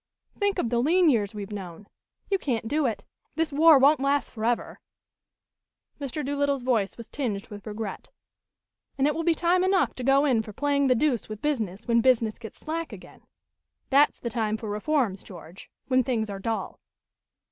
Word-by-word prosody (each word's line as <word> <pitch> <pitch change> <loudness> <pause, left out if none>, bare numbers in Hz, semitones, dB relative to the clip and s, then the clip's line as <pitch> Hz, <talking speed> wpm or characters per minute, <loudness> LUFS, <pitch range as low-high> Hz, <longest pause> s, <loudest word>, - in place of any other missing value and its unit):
Think 405 -1 0
of 240 -10 -1
the 240 - +2
lean 335 +4 +4
years 210 -4 0
we've 205 0 -6
known. 190 -2 -7 0.4
You 390 -1 0
can't 235 -8 -2
do 295 +2 +1
it. 205 -4 -4 0.3
This 320 -2 -1
war 315 +1 +7
won't 280 +2 +5
last 280 +1 0
forever 230 +1 -2 0.6
" - - -37
Mr. 285 +1 -4
Doolittle's 280 -1 0
voice 225 -6 0
was 235 - -9
tinged 220 -8 -4
with 205 0 -10
regret 210 -1 -6 0.9
"and 270 - +2
it 300 - +2
will 330 - -2
be 335 0 +3
time 355 +2 +2
enough 375 0 +2
to 255 - -7
go 275 +3 +4
in 250 -6 +3
for 215 -1 -10
playing 280 +2 +1
the 255 - +4
deuce 245 -4 0
with 215 -1 -6
business 225 -8 -2
when 235 -1 +3
business 230 -3 +2
gets 225 -2 -10
slack 325 +1 -4
again. - - -12 0.7
That's 285 +2 +4
the 235 - -5
time 220 -1 -1
for 215 -1 -6
reforms, 210 -3 0
George, 175 -1 -12 0.2
when 255 -1 +3
things 225 -4 -1
are 195 - -6
dull." 225 +2 -3
250 Hz, 185 wpm, -26 LUFS, 215-290 Hz, 0.9 s, war